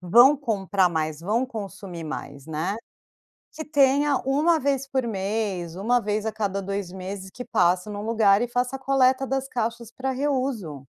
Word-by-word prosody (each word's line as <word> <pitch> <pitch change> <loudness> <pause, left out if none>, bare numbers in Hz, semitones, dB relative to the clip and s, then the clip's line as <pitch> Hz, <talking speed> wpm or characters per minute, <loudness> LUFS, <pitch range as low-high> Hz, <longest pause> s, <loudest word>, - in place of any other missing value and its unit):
vão 240 +11 +7
comprar 200 - +1
mais, 155 -2 -2
vão 220 +8 +1
consumir 195 -7 -7
mais, 145 -2 -7
né. 160 +6 -2 0.8
Que 315 - -6
tenha 285 -1 +3
1 305 +5 +3
vez 275 -1 0
por 265 -3 -1
mês, 195 -4 -2
1 240 +5 +2
vez 210 +1 -1
a 220 - 0
cada 200 -2 -2
2 195 -1 -4
meses 190 +1 -6
que 250 - -7
passa 180 +3 +2
num 205 0 -5
lugar 215 -3 +4
e 240 - 0
faça 250 +2 -1
a - - -6
coleta 265 0 +3
das 270 0 -2
caixas 235 -2 -3
para 265 +2 -3
reuso. 255 - -2
220 Hz, 170 wpm, -25 LUFS, 190-265 Hz, 0.8 s, vão